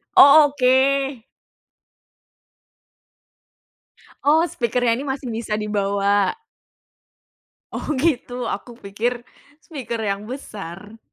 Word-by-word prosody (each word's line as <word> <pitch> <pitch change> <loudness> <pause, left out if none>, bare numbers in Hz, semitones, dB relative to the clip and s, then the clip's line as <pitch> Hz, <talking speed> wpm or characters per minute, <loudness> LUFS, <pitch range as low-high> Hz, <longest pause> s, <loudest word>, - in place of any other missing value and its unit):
Oh, 290 +2 +9
oke. 270 -1 +1 3.0
Oh, 315 +4 +4
speaker-nya 240 -4 0
ini 250 - -3
masih 265 -2 -4
bisa 220 -2 -3
dibawa. 200 - 0 1.3
Oh - - -6
gitu. 250 -4 -1
Aku 235 +4 -12
pikir, 235 +4 -3 0.4
speaker 250 -7 -6
yang 200 +1 -3
besar. 210 -4 -9
240 Hz, 80 wpm, -21 LUFS, 210-270 Hz, 3.0 s, Oh